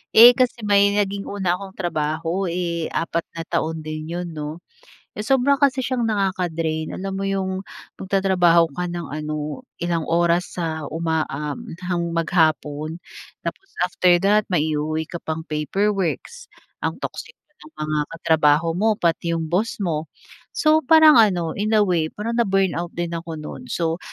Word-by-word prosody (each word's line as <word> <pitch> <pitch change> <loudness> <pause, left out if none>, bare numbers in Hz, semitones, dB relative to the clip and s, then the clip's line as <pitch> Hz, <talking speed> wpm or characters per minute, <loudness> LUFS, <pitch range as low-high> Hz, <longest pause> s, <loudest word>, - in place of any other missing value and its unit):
Eh, 235 +2 +11
kasi 245 -3 0
may 200 0 +4
naging 200 -1 -1
una 185 -3 -1
akong 195 -1 -9
trabaho, 165 +2 -1
eh, 170 -1 -2
4 165 0 -2
na 165 - -4
taon 160 -1 -2
din 155 0 -5
'yon, 175 +1 -4
'no? 155 +2 -6 0.6
Sobra 270 +5 +2
kasi 270 -2 +2
siyang 245 -2 0
nakaka-drain. 175 -6 -1
Alam 195 +1 -4
mo 195 - -2
'yong 195 -1 -1 0.5
magtatrabaho 185 -4 +3
ka 180 +5 -3
ng 175 -3 -5
ano 150 - -4 0.2
ilang 170 -2 -1
oras 170 +1 +1
sa 160 -3 -3
uma 160 -1 -1
uhm, 150 +2 -5
hang 170 -2 -2
maghapon. 155 -2 +1 0.5
Tapos 390 - -6
after 180 0 +3
that 210 +1 +3
may 160 -4 +1
i-uuwi 155 +1 -1
ka 170 +2 -7
pang 160 0 -4
paperworks, 195 - -2 0.3
ang - - -2
toxic 475 - -6 0.2
ng 310 - -15
mga 155 0 -2 0.2
katrabaho 160 -1 +3
mo 210 +6 +1
pati 170 -2 0
'yong 160 -1 -4
boss 205 +3 0
mo. 160 -3 -2 0.5
So, 310 +1 +4
parang 315 -1 +7
ano 180 -7 +3
in 215 +1 +1
a 210 - +5
way 175 -5 +1
parang 230 +7 -3
na-burnout 190 -5 0
din 170 0 -2
ako 165 -1 -5
no'n. 155 +11 -8
So, 165 0 -1
175 Hz, 155 wpm, -22 LUFS, 160-200 Hz, 0.6 s, Eh